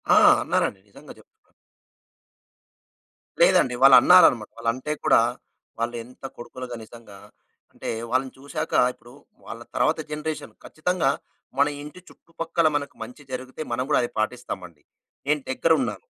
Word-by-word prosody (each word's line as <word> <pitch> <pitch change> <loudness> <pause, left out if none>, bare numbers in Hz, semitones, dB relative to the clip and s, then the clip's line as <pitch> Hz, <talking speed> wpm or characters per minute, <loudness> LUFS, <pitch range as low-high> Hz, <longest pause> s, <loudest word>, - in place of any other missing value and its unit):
ఆ! - - +6 0.3
అన్నారండి. - - 0
నిజంగా - - -13
జెప్తున్నా. 440 - -25 1.9
లేదండి. 130 - +4
వాళ్ళన్నారనమాట. 135 -5 +7
వాళ్ళంటే 130 +6 -2
కూడా - - +5 0.6
వాళ్ళు 120 +1 -2
ఎంత 125 +2 -19
కొడుకులుగా 125 +1 -8
నిజంగా 110 -3 -14 0.5
అంటే - - -7 0.2
వాళ్ళని 130 0 0
చూశాక, 155 +3 -5 0.2
ఇప్పుడు 120 - -18 0.4
వాళ్ళ - - -8
తర్వాత - - +2
జనరేషన్ 150 +1 -5
ఖచ్చితంగా 170 -2 -1 0.5
మన 140 +1 +4
ఇంటి 150 +5 -10
చుట్టుపక్కల 165 0 -2
మనకు 145 -1 -3
మంచి 125 +6 -12
జరిగితే 130 +3 -6
మనం 125 +2 0
గూడా 150 - +4
అది 120 - -2
పాటిస్తామండి. 90 -8 -4 0.5
నేను 150 -1 +1
దగ్గరున్నాను. 165 - 0
130 Hz, 120 wpm, -24 LUFS, 120-155 Hz, 1.9 s, వాళ్ళన్నారనమాట